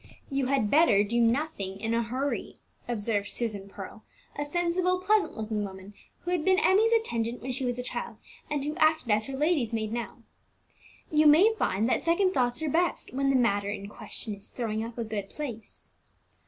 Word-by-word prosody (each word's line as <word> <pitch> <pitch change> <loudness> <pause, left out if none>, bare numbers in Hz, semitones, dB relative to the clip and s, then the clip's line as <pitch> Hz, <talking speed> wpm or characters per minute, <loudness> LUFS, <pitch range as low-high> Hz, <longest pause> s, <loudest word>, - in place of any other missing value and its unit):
"You 275 -1 0
had 260 -6 +1
better 280 -10 +5
do 235 +3 +1
nothing 230 -6 0
in 225 +2 -1
a 230 - +2
hurry," 255 +5 -3 0.3
observed 210 -3 -1
Susan 205 -4 -3
Pearl, 195 +2 -9 0.3
a 290 - -2
sensible, 350 +4 0
pleasant 410 +2 +1
looking 215 -1 -2
woman, 190 0 -8 0.3
who 355 - -4
had 350 -4 0
been 375 +1 +4
Emmie's 435 +2 +4
attendant 240 - 0
when 260 - -3
she 255 +1 -2
was 245 -1 -1
a 250 - -3
child, - - -5 0.3
and 290 -2 -1
who 300 +1 -2
acted 310 -7 +3
as 215 +1 +2
her 270 -1 -5
lady's 290 -6 +1
maid 220 -1 -2
now. 235 0 -5 0.9
"You 305 0 +5
may 360 +10 +7
find 215 - 0
that - - +1
second 370 +3 +2
thoughts 245 +1 0
are - - 0
best, 340 -1 0
when 275 +1 +1
the 270 - +3
matter 205 -5 +2
in 200 -1 -5
question 215 +1 -5
is 200 0 -10
throwing 220 -3 -3
up 230 +1 -7
a 235 - -1
good 210 -3 -4
place." 240 -8 -7
245 Hz, 195 wpm, -28 LUFS, 215-310 Hz, 0.9 s, may